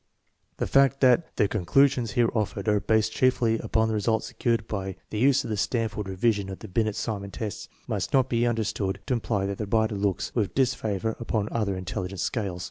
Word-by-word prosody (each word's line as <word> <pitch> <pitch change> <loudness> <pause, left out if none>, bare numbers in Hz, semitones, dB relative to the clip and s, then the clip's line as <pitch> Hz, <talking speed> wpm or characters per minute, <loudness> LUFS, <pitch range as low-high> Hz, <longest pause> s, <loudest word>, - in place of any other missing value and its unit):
The - - -1
fact 135 0 +3
that 130 +5 +3
the 105 - +3
conclusions 115 +5 +2
here 120 -2 +2
offered 110 -1 -2
are 105 -1 +3
based 110 +1 +2
chiefly 120 -2 +2
upon 110 0 +1
results 110 +1 0
secured 115 -2 -1
by 95 -3 -4 0.2
the 105 - -2
use 135 +2 +4
of - - -5
the 105 - -1
Stanford 110 -2 -1
Revision 100 0 0
of 95 - -6
the 110 - -10
Binet 110 +2 0
Simon 100 -3 -3
tests 105 0 -6 0.2
must 100 -4 -2
not 130 -2 +3
be 120 -1 +1
under 115 -2 0
stood 100 -2 -2
to 135 - 0
imply 110 -4 -1
that 100 0 -3
the 105 - -3
writer 110 +1 +1
looks 100 -2 -1
with 110 -5 -1
disfavor 110 -5 0
upon 110 -3 -1
other 105 -4 -1
intelligence 95 0 -4
scales. 100 -7 -2
110 Hz, 200 wpm, -26 LUFS, 100-120 Hz, 0.2 s, use